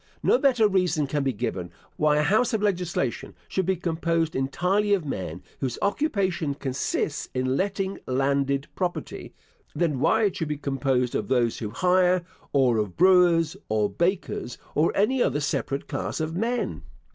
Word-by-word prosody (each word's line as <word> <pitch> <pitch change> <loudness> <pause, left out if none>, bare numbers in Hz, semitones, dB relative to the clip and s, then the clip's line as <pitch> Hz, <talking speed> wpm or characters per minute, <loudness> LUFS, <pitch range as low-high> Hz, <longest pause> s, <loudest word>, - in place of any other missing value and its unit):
No 485 - +4
better 245 -6 +4
reason 180 -6 +1
can 145 +1 -1
be 135 - +1
given, 100 -6 -3 0.3
why 150 -1 +3
a 150 - +3
house 220 +8 +2
of 215 - -1
legislation 175 - -1
should 190 -2 -1
be 190 - +2
composed 165 -1 -1
entirely 185 +10 +1
of 180 -6 -4
men 90 - -5 0.2
whose 130 -3 -2
occupation 195 - 0
consists 140 +2 -2
in 130 +1 0
letting 195 +2 -1
landed 140 +1 +1
property, 180 -2 -4 0.4
than 155 -6 0
why 220 - +3
it 200 -3 +1
should 160 - -2
be 150 0 -2
composed 135 -3 0
of - - -2
those 120 -3 +1
who 110 - -4
hire, 180 - +2 0.3
or 130 -5 +3
of 105 -4 -3
brewers, 175 -3 +5
or 105 -1 +1
bakers, 175 -8 -1 0.2
or 155 +3 +2
any 245 +6 +2
other 145 - +1
separate 140 -1 -2
class - - -3
of 160 +1 -2
men. 225 - -1
160 Hz, 160 wpm, -25 LUFS, 135-190 Hz, 0.4 s, brewers